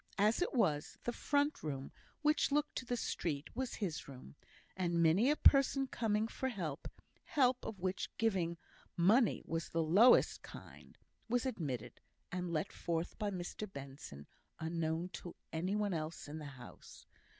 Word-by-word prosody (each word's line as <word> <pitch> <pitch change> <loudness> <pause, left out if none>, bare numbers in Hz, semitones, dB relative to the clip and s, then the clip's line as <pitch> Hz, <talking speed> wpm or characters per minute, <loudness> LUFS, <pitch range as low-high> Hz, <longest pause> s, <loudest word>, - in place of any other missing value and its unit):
As 210 - +3
it 360 - +1
was, 160 - +1
the 240 - -1
front 290 +3 +1
room, 135 -3 -4 0.3
which 300 -1 +3
looked 295 +1 +1
to 255 - -3
the 245 - 0
street, 150 -9 -3
was 260 -2 -2
his 185 -8 -3
room; 130 - -11 0.4
and 175 -2 0
many 170 - +5
a 300 - +4
person 275 -2 +5
coming 220 -4 0
for 260 +3 -2
help 170 - -4 0.4
help 255 -3 +2
of 215 - -5
which 185 +1 -2
giving 185 -7 +1 0.4
money 210 +6 +4
was 165 -1 -3
the 165 0 +1
lowest 200 +11 +6
kind - - -12 0.3
was 245 +2 +1
admitted, 150 - -4 0.3
and 180 -1 -3
let 155 -2 -1
forth 165 0 -2
by 210 - 0
Mr 190 +2 -5
Benson, 135 - -9 0.3
unknown 165 +1 -1
to 175 -1 -8 0.2
any 180 +5 0
one 205 -2 0
else 155 -1 -4
in 150 +2 -6
the 150 - -7
house. 125 - -12
180 Hz, 160 wpm, -36 LUFS, 160-235 Hz, 0.4 s, lowest